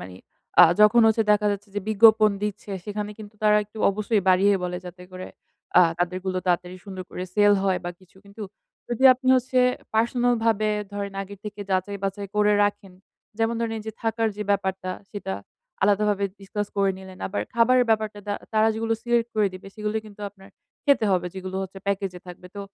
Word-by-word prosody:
মানি 90 0 -10 0.4
আ - - +11 0.2
যখন 210 +3 +7
হচ্ছে 220 0 +3
দেখা 210 0 +2
যাচ্ছে 205 +1 -7
যে 205 - -1
বিজ্ঞাপন 220 0 +6
দিচ্ছে 210 0 -4
সেখানে 210 0 -4
কিন্তু 215 0 -11
তারা 210 0 +5
একটু 210 +2 -14
অবশ্যই 210 0 0
বাড়িয়ে 195 +2 +5
বলে 180 0 -3
যাতে 180 0 -10
করে 185 0 -7 0.5
আ - - +9 0.2
তাদেরগুলো 185 +1 -2
তাড়াতাড়ি 180 +1 0
সুন্দর 190 -2 -7
করে 180 - -5
সেল 205 -1 +5
হয় 190 -2 +1
বা 175 - -3
কিছু। 185 +1 -23
কিন্তু 200 +2 -11 0.5
যদি 240 +2 -1
আপনি 255 +1 -4
হচ্ছে 255 +1 0 0.4
পার্সোনালভাবে 230 -2 +2 0.2
ধরেন 200 -1 -5
আগের 200 +1 -11
থেকে 210 0 -7
যাচাই 190 +2 -1
বাচাই 195 +1 -3
করে 210 0 +4
রাখেন, 205 -2 -3 0.5
যেমন 225 +1 +1
ধরেন 225 -1 -2
এইযে 220 0 -7
থাকার 225 0 0
যে 210 - -3
ব্যাপারটা 190 -2 -1 0.2
সেটা 200 - -5 0.5
আলাদাভাবে 205 0 +2 0.2
ডিসকাস 205 +1 -4
করে 195 -1 +3
নিলেন। 190 -1 -12
আবার 205 - -3
খাবারের 245 +2 +4
ব্যাপারটা 215 -1 0
তা 205 - 0 0.2
তারা 220 0 +4
যেগুলো 225 0 -1
সিলেক্ট 240 -1 +1
করে 210 -2 +3
দিবে। 185 - -11
সেগুলোই 215 0 -3
কিন্তু 210 0 -14
আপনার 195 0 -18 0.4
খেতে 280 -5 +4
হবে 180 -1 +1
যেগুলো 190 0 -6
হচ্ছে 190 0 -8
প্যাকেজে 195 -2 -2
থাকবে। 180 0 -11
তো - - -4
205 Hz, 180 wpm, -24 LUFS, 190-220 Hz, 0.5 s, আ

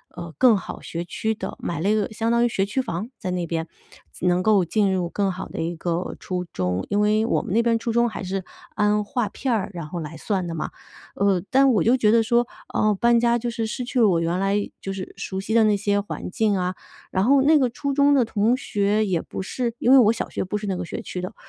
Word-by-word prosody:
呃， 170 -1 -7
更 245 -4 +6
好 - - -7
学 170 +1 -5
区 220 +6 -2
的， 215 - -6
买 170 -3 -3
了 190 +5 0
一 - - +4
个 215 -2 0
相 225 +1 -1
当 235 0 +3
于 - - +4
学 195 -4 0
区 210 +7 -1
房 210 -1 -4
在 185 - -4
那 180 -1 -2
边， 165 0 -3 0.4
自 - - -6
能 180 0 +3
够 210 -3 +4
进 200 +3 +1
入 180 -2 -1
更 195 +1 0
好 180 - -6
的 - - -7
一 170 +1 -2
个 170 +2 -3
初 180 -1 -3
中， 90 - -2
因 205 - +1
为 210 +1 +3
我 - - +1
们 - - -7
那 230 +2 +3
边 230 -1 +2
初 230 - -2
中 235 +1 +3
还 215 -3 -6
是 190 +1 -3 0.3
按 210 0 +2
划 230 +2 -1
片 260 +6 -3
儿， 215 -3 -1
然 170 -3 -6
后 175 +3 -5
来 155 0 -7
算 195 -4 -2
的 170 - -4
嘛。 160 - -3 0.5
呃， 200 -3 +2
但 270 0 +5
我 215 - +2
就 240 +3 +4
觉 215 -4 +3
得 230 0 +5
说， 235 +1 +2 0.3
呃， 215 0 +2
搬 235 +3 +3
家 235 0 +2
就 240 +1 -3
是 230 -1 -2
失 220 +3 -4
去 245 +1 -2
了 225 - +6
我 175 -4 +3
原 170 +2 -1
来 195 +1 +1 0.2
就 195 - -4
是 190 -1 -7
熟 190 - -4
悉 195 +3 -3
的 230 - +6
那 210 -1 +4
些 205 0 +1
环 205 - -5
境 210 +2 +1
啊。 180 0 -1 0.4
然 190 - +1
后 275 +2 +5
那 305 +3 +5
个 265 -3 +3
初 280 +3 -3
中 285 +1 +4
的 270 -3 +4
同 225 +1 +1
学 210 -4 0
也 185 -4 0
不 - - -6
是 235 +4 -3
因 250 - +3
为 270 - +9
我 225 -3 +6
小 - - -4
学 - - -3
不 190 +3 -3
是 205 - -5
那 190 - -1
个 180 0 -4
学 - - -6
区 180 - -6
的， 180 - -6
205 Hz, 290 characters per minute, -23 LUFS, 180-235 Hz, 0.5 s, 为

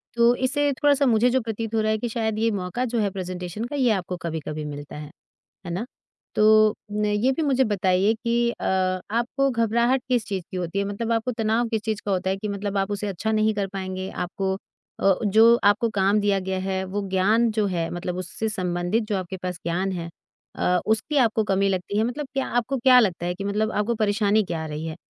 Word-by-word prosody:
तो 235 0 +5
इससे 285 +3 +1
थोड़ा-सा 285 0 +3
मुझे 240 0 +4
जो 260 +1 +2
प्रतीत 225 0 -4
हो 220 - +2
रहा 215 0 +1
है 220 - +1
कि 235 +2 -3
शायद 220 -2 -1
यह 225 -1 +1
मौका 190 +6 -2
जो 235 - 0
है 205 -2 +1
प्रेज़ेंटेशन 185 +2 -5
का 290 +4 -5
ये 255 -5 +3
आपको 185 -3 -2
कभी-कभी 155 -2 -5
मिलता 145 0 -7
है। 150 0 -8 0.5
है 175 - -5
ना? 190 +8 -3 0.5
तो 215 0 +5 0.2
न 210 0 0
ये 210 +5 +2
भी 295 - -2
मुझे 265 -3 +3
बताइए 195 -1 +2
कि 235 0 +2
अ, - - -7 0.5
आपको 250 +4 +1
घबराहट 235 +2 +2
किस 240 -3 +1
चीज़ 195 -3 -3
की 185 - -4
होती 180 +2 -2
है? 200 - 0
मतलब 215 +3 -3
आपको 230 +2 0
तनाव 225 +1 0
किस 220 -2 -1
चीज़ 215 -2 -2
का 205 - -1
होता 190 0 0
है 190 - 0
कि 210 - -5
मतलब 200 0 -3
आप 195 +1 0
उसे 205 0 -2
अच्छा 200 +3 -2
नहीं 215 0 +2
कर 200 -1 -1
पाएँगे? 185 0 -4
आपको 190 +2 -2 0.4
अ, 195 -1 +4
जो 225 +3 +6
आपको 205 +3 +3
काम 200 +2 +3
दिया 205 -1 +2
गया 190 0 -3
है, 190 0 -2
वो 200 +2 -3
ज्ञान 215 +5 +3
जो 215 -1 0
है, 170 -3 -2
मतलब 175 0 -4
उससे 185 +4 -4
संबंधित 180 +2 -1
जो 205 - 0
आपके 185 0 -5
पास 180 -2 -5
ज्ञान 180 +3 -1
है 170 -2 -4 0.5
अ, 180 0 +2
उसकी 220 +8 0
आपको 225 -4 +3
कमी 195 -1 +1
लगती 190 +2 -2
है। 220 - +3
मतलब 270 +5 -3
क्या 270 -1 0
आपको 255 +3 0
क्या 250 0 +6
लगता 180 -7 +1
है 175 - -1
कि 195 - -6
मतलब 210 +2 0
आपको 215 +3 0
परेशानी 210 0 +2
क्या 170 -4 -4
आ - - -5
रही 150 +1 -5
है? 160 - -5
210 Hz, 225 wpm, -24 LUFS, 185-230 Hz, 0.5 s, जो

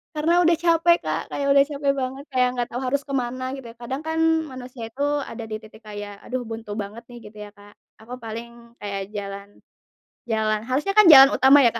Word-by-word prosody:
Karena 315 +3 +1
udah 335 0 +5
capek 340 0 +4
Kak, - - -2
kayak 280 0 -2
udah 275 0 +6
capek 280 -1 0
banget, 265 +2 -4
kayak 250 -1 +3
enggak 245 -1 -2
tahu 245 +2 -5
harus 280 +2 0
ke 275 - -6
mana 255 +2 -5
gitu, 255 -3 -10
kadang 265 +4 -4
kan 320 0 -1 0.3
manusia 255 -2 -9
itu 270 +5 -9 0.3
ada 230 0 -7
di 215 - -4
titik 215 +1 -16
kayak, 205 -1 -7
aduh 255 0 -4
buntu 225 -2 -7
banget 215 +4 -9
nih 240 - -11
gitu 210 0 -15
ya - - -11
Kak. 205 0 -16 0.3
Aku 240 +3 -10
paling 225 +1 -6 0.3
kayak 200 -1 -4
jalan 200 0 -6 0.8
jalan 215 -1 0
harusnya 295 +10 0
kan 425 - +8
jalan 270 0 +10
utama 270 +2 +6
ya - - +7
Kak, - - -2
250 Hz, 210 wpm, -23 LUFS, 220-275 Hz, 0.8 s, jalan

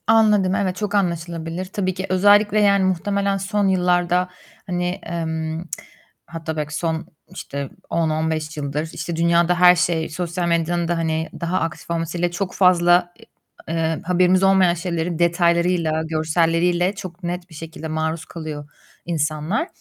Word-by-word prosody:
Anladım. 210 -4 +4
Evet, 185 -3 0
çok 210 +1 -3
anlaşılabilir. 170 -2 -2
Tabii 185 0 -2
ki. 185 +1 -4
Özellikle, 205 +3 +4
yani, 200 -1 +4
muhtemelen 200 +2 0
son 195 +1 0
yıllarda, 180 -1 +2 0.4
hani, 180 -1 -1 0.2
emm, 160 -1 -3 0.6
hatta 160 -1 -6
belki 150 0 -3
son, 160 0 -2 0.2
işte, 140 -1 -6 0.2
10-15 160 -1 -1
yıldır, 150 +2 -3
işte, 170 - -4
dünyada 170 +1 +2
her 180 0 +8
şey 165 -2 0
sosyal 175 +2 -3
medyanın 170 0 0
da, 175 0 0
hani, 160 -1 -1
daha 170 +2 0
aktif 165 0 -5
olmasıyla 170 +1 -1
çok 185 +1 -3
fazla, 175 -1 +4 0.5
eee, 165 -1 -1
haberimiz 180 +1 +3
olmayan 190 -2 +5
şeyleri 170 -1 -3
detaylarıyla, 170 -1 +2
görselleriyle 165 +3 +1
çok 185 -2 -9
net 175 +1 -4
bir 160 - -13
şekilde 160 0 -7
maruz 160 +1 -2
kalıyor 155 -3 -7 0.4
insanlar. 155 - -1
170 Hz, 135 wpm, -21 LUFS, 160-185 Hz, 0.6 s, her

